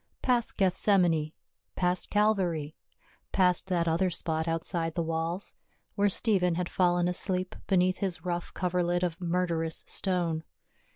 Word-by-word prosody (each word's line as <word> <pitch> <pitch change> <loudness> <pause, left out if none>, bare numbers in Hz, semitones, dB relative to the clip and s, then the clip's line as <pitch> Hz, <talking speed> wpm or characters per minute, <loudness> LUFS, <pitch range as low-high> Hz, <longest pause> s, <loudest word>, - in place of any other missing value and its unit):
Past 245 -3 +1
Gethsemanc, 180 -5 +2 0.4
past 180 0 0
Calvary, 185 -8 +1 0.6
past 180 -1 +3
that 175 -3 0
other 170 +3 +2
spot 160 -1 -1
outside 165 0 0
the 170 - 0
walls, 165 +4 -2 0.4
where 205 0 +2
Stephen 185 -5 +2
had 180 0 -2
fallen 175 -1 +2
asleep 185 +1 0
beneath 185 -1 +2
his 185 -3 -3
rough 175 -1 -3
coverlid 175 -1 0
of 175 +1 -2
murderous 170 -2 -1
stone. 175 -4 -1
180 Hz, 125 wpm, -29 LUFS, 165-185 Hz, 0.6 s, past